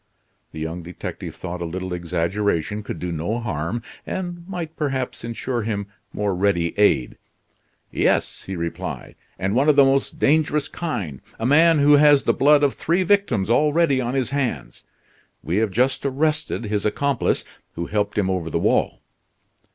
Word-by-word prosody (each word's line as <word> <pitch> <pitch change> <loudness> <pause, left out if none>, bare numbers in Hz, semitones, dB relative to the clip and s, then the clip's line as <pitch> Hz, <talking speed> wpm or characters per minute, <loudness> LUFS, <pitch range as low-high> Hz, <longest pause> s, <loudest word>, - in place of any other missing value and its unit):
The 80 - -8
young 80 +3 -4
detective 85 +1 -7
thought 90 0 -6
a - - -2
little 90 +2 -4
exaggeration 90 +3 -1
could 105 - -6
do 90 -1 -4
no 85 +9 -2
harm, 100 +1 -3 0.2
and 175 -1 -5
might 170 -4 -5
perhaps 130 -6 -3
insure 120 +1 -3
him 105 -2 -2 0.3
more 105 -1 -1
ready 90 -3 +1
aid. 70 -12 +3 0.7
"Yes," - - +1
he 95 - -6
replied; 85 -1 -5 0.2
"and 95 +2 -1
one 135 +6 +3
of 150 - +5
the 140 - +7
most 135 0 +1
dangerous 150 0 +2
kind 95 - -4 0.2
a 115 - -2
man 160 +5 +5
who 145 0 +6
has 145 -1 +6
the - - +2
blood 145 +1 +4
of 140 - +3
three 175 +3 0
victims 180 - +2
already 150 +2 +3
on 125 +1 -2
his 130 -2 0
hands. 140 -4 -3 0.6
We 85 +6 -1
have 110 0 +2
just 125 +7 +1
arrested 150 0 0
his 105 -1 -2
accomplice, 140 +5 0 0.3
who 85 - -3
helped 105 +1 -1
him 100 -3 +2
over 90 -3 -1
the - - -1
wall." - - +1
115 Hz, 165 wpm, -22 LUFS, 95-145 Hz, 0.7 s, the